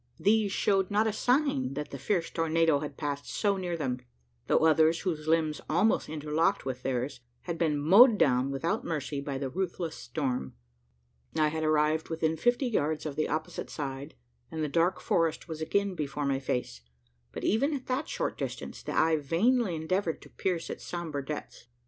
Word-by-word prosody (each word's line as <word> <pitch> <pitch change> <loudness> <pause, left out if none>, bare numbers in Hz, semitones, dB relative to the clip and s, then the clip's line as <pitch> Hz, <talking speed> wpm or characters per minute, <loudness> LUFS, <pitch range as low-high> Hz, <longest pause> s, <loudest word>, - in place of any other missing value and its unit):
These 210 0 +3
showed 195 -1 +2
not 210 +2 +2
a 220 - 0
sign 245 - +1
that 150 +1 -4
the 140 - -6
fierce 175 +2 0
tornado 165 -2 +2
had 145 -2 -6
passed 145 -1 -3
so 205 -2 +1
near 175 -2 -2
them; 130 -5 -2 0.5
though - - +3
others, 160 +1 +4
whose 160 -4 -3
limbs 155 -2 +1
almost 185 +4 +2
interlocked 155 +4 0
with 130 -1 -4
theirs, 130 +1 -2 0.2
had 170 -2 -5
been 155 -3 +2
mowed 205 - +7
down 130 -5 +3
without 170 - -1
mercy 145 -3 -3
by 140 -1 -3
the 135 0 -2
ruthless 175 -2 -3
storm. 125 - -3 0.8
I 155 -1 +4
had 160 +1 -3
arrived 155 +1 +2
within 160 -1 0
fifty 240 - +2
yards 155 - 0
of 150 -3 -4
the 155 - 0
opposite 155 +1 -3
side, 140 -1 -5 0.3
and 160 -1 -3
the - - 0
dark 170 +5 +1
forest 165 -1 0
was 160 -2 -6
again 200 +4 0
before 150 -3 -3
my 135 -1 +1
face; 125 - -3 0.5
but - - -7
even 275 +9 +2
at 260 - -6
that 260 +4 -2
short - - -2
distance, - - -5
the - - -4
eye 160 0 +4
vainly 185 - +2
endeavoured 165 +2 -1
to - - -15
pierce 175 -3 -2
its - - -7
sombre 160 -5 -4
depths. 140 -4 -7
160 Hz, 180 wpm, -29 LUFS, 145-185 Hz, 0.8 s, mowed